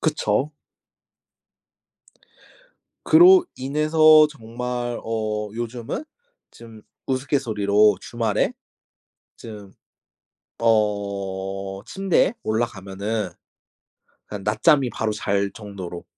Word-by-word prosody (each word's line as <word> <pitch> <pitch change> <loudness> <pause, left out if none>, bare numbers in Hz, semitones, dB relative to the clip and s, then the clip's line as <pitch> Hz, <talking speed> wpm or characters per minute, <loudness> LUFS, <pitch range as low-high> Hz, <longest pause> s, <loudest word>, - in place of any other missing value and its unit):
그쵸. 145 -3 0 2.5
그로 360 +2 +7
인해서 155 +3 +5
정말 120 -1 -5
어 110 -2 -3
요즘은 120 - -5 0.5
좀 115 -2 -14 0.2
우스갯소리로 105 -7 +1
주말에 115 -3 -1 0.9
좀 105 -4 -11 0.9
어 100 -3 -1
침대에 195 0 +1
올라가면은 105 -2 -3 1.0
그냥 100 -2 -8
낮잠이 135 +5 +3
바로 110 -2 -2
잘 100 -1 -1
정도로. 95 -5 -8
110 Hz, 165 characters per minute, -22 LUFS, 100-130 Hz, 2.5 s, 그로